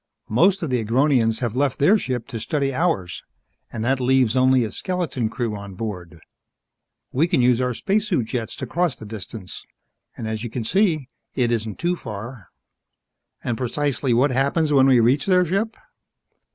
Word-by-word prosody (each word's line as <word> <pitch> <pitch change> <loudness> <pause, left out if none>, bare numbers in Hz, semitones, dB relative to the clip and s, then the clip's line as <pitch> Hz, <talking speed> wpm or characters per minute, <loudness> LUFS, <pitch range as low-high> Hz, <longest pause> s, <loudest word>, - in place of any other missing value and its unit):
Most 180 - +3
of 155 - -2
the 125 -3 +1
Agronians 115 -1 +2
have 120 -2 -2
left 135 0 +1
their 170 +10 +5
ship 125 - -2
to 115 -4 -5
study 140 +2 -1
ours, 125 - -1 0.5
and 110 0 -4
that 130 +2 +1
leaves 130 -2 +2
only 130 -1 +4
a 110 - -3
skeleton 170 - -2
crew 115 -2 -3
on 100 -2 -8
board. 90 -6 -6 0.9
We 150 +6 +2
can 170 - +1
use 125 0 +3
our 125 -1 -1
spacesuit 195 - 0
jets 115 0 -4
to 135 - -5
cross 165 +3 0
the 110 - -11
distance. 105 -2 -8 0.5
As 110 -1 -4
you 120 - -4
can 115 +1 -4
see, 155 - +1 0.3
it 120 -2 +1
isn't 110 -2 -2
too 175 +1 0
far." 115 - -8 1.0
"And 120 - -1
precisely 135 +1 -1
what 130 +4 +3
happens 140 +4 +1
when 135 -1 +5
we 130 -2 +5
reach 125 - +2
their 180 -1 +4
ship?" 200 +7 -1
125 Hz, 170 wpm, -22 LUFS, 115-150 Hz, 1.0 s, their